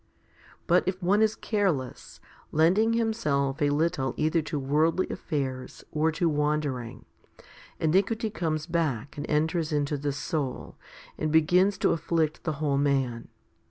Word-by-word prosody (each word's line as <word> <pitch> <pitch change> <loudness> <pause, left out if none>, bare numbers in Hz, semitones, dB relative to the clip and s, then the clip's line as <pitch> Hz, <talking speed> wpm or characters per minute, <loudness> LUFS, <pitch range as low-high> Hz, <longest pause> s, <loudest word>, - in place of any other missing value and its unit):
But 175 +2 +4
if 185 0 -1
one 200 +4 +3
is 220 0 +3
careless, 185 - -2 0.3
lending 190 +9 +3
himself 150 -13 0
a 145 - +3
little 150 -2 0
either 160 +2 +1
to 155 0 -4
worldly 155 +6 +1
affairs 130 -5 -4
or 155 +1 +1
to 170 +2 +1
wandering, 150 -5 -1 0.7
iniquity 200 +7 +1
comes 155 -6 -2
back 155 -7 -2
and 145 - -6
enters 160 +1 0
into 145 0 0
the 145 +1 -2
soul, 140 -2 -4 0.4
and 155 0 -1
begins 180 +5 +4
to - - +2
afflict 160 -1 -1
the 160 - 0
whole 140 -1 0
man. 135 -5 0
155 Hz, 135 wpm, -27 LUFS, 145-175 Hz, 0.7 s, But